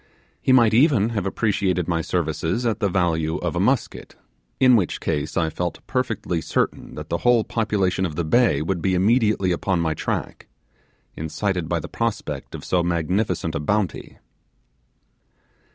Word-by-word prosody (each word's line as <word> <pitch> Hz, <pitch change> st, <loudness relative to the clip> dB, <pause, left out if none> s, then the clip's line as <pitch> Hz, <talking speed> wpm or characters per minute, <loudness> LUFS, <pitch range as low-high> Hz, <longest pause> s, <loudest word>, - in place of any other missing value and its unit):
He -, -, +2 dB
might 120 Hz, -4 st, +5 dB
even 120 Hz, -4 st, +4 dB
have 105 Hz, -5 st, -2 dB
appreciated 95 Hz, -4 st, 0 dB
my 85 Hz, -2 st, 0 dB
services 80 Hz, +7 st, -1 dB
at 110 Hz, -3 st, 0 dB
the 100 Hz, -, +1 dB
value 80 Hz, -3 st, 0 dB
of -, -, -3 dB
a -, -, 0 dB
musket, -, -, -1 dB, 0.4 s
in 130 Hz, -2 st, +6 dB
which 95 Hz, -6 st, 0 dB
case 75 Hz, +1 st, -2 dB
I 80 Hz, -2 st, +1 dB
felt 85 Hz, +2 st, -4 dB
perfectly 115 Hz, -9 st, -2 dB
certain -, -, -2 dB
that -, -, -8 dB
the -, -, -1 dB
whole 120 Hz, -2 st, +3 dB
population 105 Hz, -5 st, 0 dB
of 80 Hz, -5 st, -2 dB
the 85 Hz, -, -1 dB
bay 115 Hz, -, +3 dB
would 85 Hz, 0 st, -2 dB
be 95 Hz, +1 st, +1 dB
immediately 105 Hz, -1 st, +2 dB
upon 90 Hz, +1 st, 0 dB
my 80 Hz, -1 st, 0 dB
track, -, -, -4 dB, 0.7 s
incited 80 Hz, +2 st, -2 dB
by 85 Hz, -, 0 dB
the -, -, -7 dB
prospect 115 Hz, -2 st, -3 dB
of -, -, -8 dB
so 90 Hz, -, +1 dB
magnificent 85 Hz, +1 st, -1 dB
a 80 Hz, -, -2 dB
bounty. 95 Hz, +3 st, -2 dB
95 Hz, 160 wpm, -23 LUFS, 85-110 Hz, 0.7 s, in